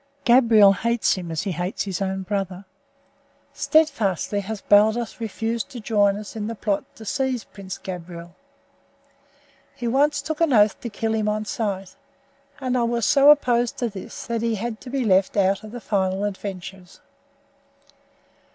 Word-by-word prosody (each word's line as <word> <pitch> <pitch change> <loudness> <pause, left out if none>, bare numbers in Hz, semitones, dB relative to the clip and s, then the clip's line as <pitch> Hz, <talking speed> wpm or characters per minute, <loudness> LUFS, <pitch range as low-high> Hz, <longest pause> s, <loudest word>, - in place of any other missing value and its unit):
Gabriel 230 -5 +6
hates 235 +3 +1
him 180 -3 -5
as 160 -2 -2
he 195 - -2
hates 175 +2 -3
his 195 -2 -4
own 190 0 -2
brother. 195 -1 -3 0.9
Steadfastly 215 - +1
has 205 +2 -5
Baldos 220 +3 +3
refused 225 +1 -3
to 245 - -8
join 205 -2 +2
us 210 +1 -9
in 215 -1 -3
the 230 - -4
plot 205 -2 -1
to 220 - -11
seize 260 +1 -1
Prince 190 -2 -9
Gabriel. 175 -1 -8 1.4
He 240 - -4
once 285 +5 +2
took 315 +1 -4
an 325 -5 +3
oath 210 -2 +4
to 235 - -5
kill 220 +1 -2
him 215 -1 0
on 215 0 -2
sight, 195 -4 -3 0.6
and 255 -2 -1
I 250 - +2
was 235 -1 0
so 280 +1 +6
opposed 245 -5 +3
to 240 - -1
this 195 -3 -8
that 230 -1 -2
he 230 -1 0
had 220 +2 -5
to 255 - -9
be 260 -1 -1
left 190 0 +2
out 195 +1 +2
of 215 - -9
the 245 - -7
final 190 -3 -1
adventures." 190 -2 -6
215 Hz, 165 wpm, -23 LUFS, 195-235 Hz, 1.4 s, Gabriel